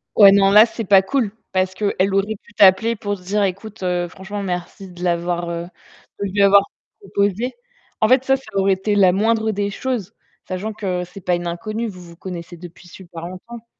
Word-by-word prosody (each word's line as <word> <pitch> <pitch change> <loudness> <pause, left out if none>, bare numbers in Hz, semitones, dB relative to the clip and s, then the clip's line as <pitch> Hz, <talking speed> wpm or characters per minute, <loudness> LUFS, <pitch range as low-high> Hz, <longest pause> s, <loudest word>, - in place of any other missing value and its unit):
Ouais, 200 -2 +9
non, 195 0 +4
là, 210 +3 +8
c'est 230 - -6
pas 195 0 +6
cool! 225 +1 -1 0.2
Parce 185 0 +1
qu'elle 195 -1 0
aurait 200 +2 0
pu 235 - -22
t'appeler 200 +4 +5
pour 205 -1 -4
se 180 - -18
dire: 205 +3 -1
«Ecoute, 200 +3 -8
heu, 180 -1 -1
franchement, 195 +4 -7
merci 180 +1 -5
de 175 0 -10
l'avoir, 175 0 -1
heu, 170 0 -4 0.6
de 200 - -1
lui 200 +1 +2
avoir 200 0 +6 0.4
proposé». 205 - -1 0.5
En - - +5
fait, 255 0 +4
ça, 270 0 +3
ça 270 - -9
aurait 195 0 +2
été 195 +2 -1
la 190 -3 +5
moindre 220 +3 +1
des 205 0 -2
choses, 230 -4 -4 0.3
sachant 185 +4 -4
que 185 -4 -3
ce 180 +2 -13
n'est 195 - -9
pas 180 - 0
une 175 0 -4
inconnue. 215 +7 -4
Vous 185 -4 -9
vous 170 -1 -13
connaissez 175 -1 -8
depuis 175 +1 -13
super 170 -2 -10
longtemps. 225 +6 -10
195 Hz, 210 wpm, -20 LUFS, 180-210 Hz, 0.6 s, Ouais